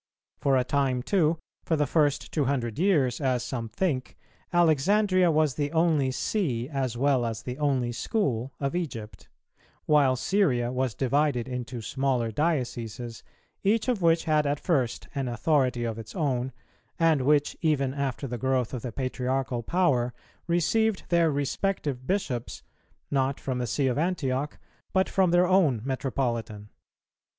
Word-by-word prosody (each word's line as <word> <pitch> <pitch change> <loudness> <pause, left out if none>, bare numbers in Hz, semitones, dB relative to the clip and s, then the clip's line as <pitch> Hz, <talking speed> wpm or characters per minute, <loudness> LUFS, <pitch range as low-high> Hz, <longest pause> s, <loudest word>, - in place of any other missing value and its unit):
For 135 -1 +3
a 130 - +2
time 130 -2 0
too, 165 -3 +2 0.3
for 165 - +1
the 150 -1 +2
first 145 -2 +1
two 150 -3 0
hundred 125 -4 -1
years, 150 -9 +2
as 130 -3 +1
some 120 -3 -4
think, 130 - -2 0.3
Alexandria 180 +3 +3
was 155 -3 +2
the 145 +1 -2
only 160 -5 +3
See 130 - -1
as 135 -5 -2
well 135 -1 +2
as 115 -1 -3
the 125 +3 -6
only 135 -5 +1
school 130 - -1
of 140 +3 -2
Egypt; 115 - -5 0.6
while 140 -4 +4
Syria 130 -7 +1
was 130 -2 -1
divided 135 -2 +1
into 125 -2 -5
smaller 130 -3 0
dioceses, 120 -5 -2 0.4
each 215 +4 +1
of 240 -6 0
which 165 -1 +3
had 155 -2 +2
at 145 0 0
first 135 -10 0
an 135 -2 -2
authority 125 0 +1
of 115 -1 -3
its 115 0 -10
own, 130 -6 -1 0.5
and 165 -4 +3
which, 145 +2 +2
even 140 -5 +1
after 140 -1 -3
the 120 -2 -4
growth 130 -1 0
of 125 - -3
the 125 - -5
Patriarchal 130 0 -2
power, 125 -5 +1 0.3
received 190 +5 +1
their 170 -2 +4
respective 145 -2 -2
bishops, 145 - -2 0.5
not 135 -1 +1
from 130 -2 -3
the 125 - -2
See 135 +5 0
of 130 +1 +1
Antioch, 150 -5 -1 0.4
but 190 0 +3
from 190 -2 +2
their 175 +1 +4
own 175 - +3
metropolitan. 120 -6 -2
135 Hz, 150 wpm, -27 LUFS, 125-160 Hz, 0.6 s, while